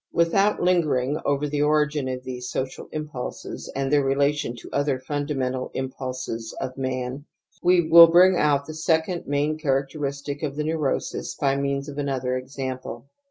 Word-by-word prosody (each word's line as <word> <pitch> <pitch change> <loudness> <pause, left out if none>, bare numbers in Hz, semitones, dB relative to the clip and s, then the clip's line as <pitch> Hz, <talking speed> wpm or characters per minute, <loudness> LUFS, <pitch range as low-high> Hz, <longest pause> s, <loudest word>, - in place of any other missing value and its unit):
Without 195 +5 +3
lingering 155 -6 +1
ovcf 145 +1 0
the 145 -1 0
origin 150 -1 +2
of 130 0 -4
these 125 -1 -6
social 130 +1 -4
impulses 150 -5 -6
and 135 0 -1
their 145 -1 +4
relation 140 -2 +1
to 120 - -11
other 145 -2 +1
funda 145 +2 -3
^^ - - -4
mental 130 0 -2
impulses 130 -3 -5
of 130 -1 -4
man, 130 +1 -3 0.4
we 175 -2 +4
will 170 +1 +10
bring 180 +2 +6
out 145 -3 +2
the 155 - -7
Xjy - - -8
second 160 +2 0
main 145 +2 0
characteristic 140 0 -2
of 145 -3 -3
the 150 - -2
neurosis 155 -3 -2
by 135 -2 +1
means 140 0 -1
of 145 0 -6
another 130 -3 -1
example. 130 -1 -6
140 Hz, 165 wpm, -24 LUFS, 130-150 Hz, 0.4 s, will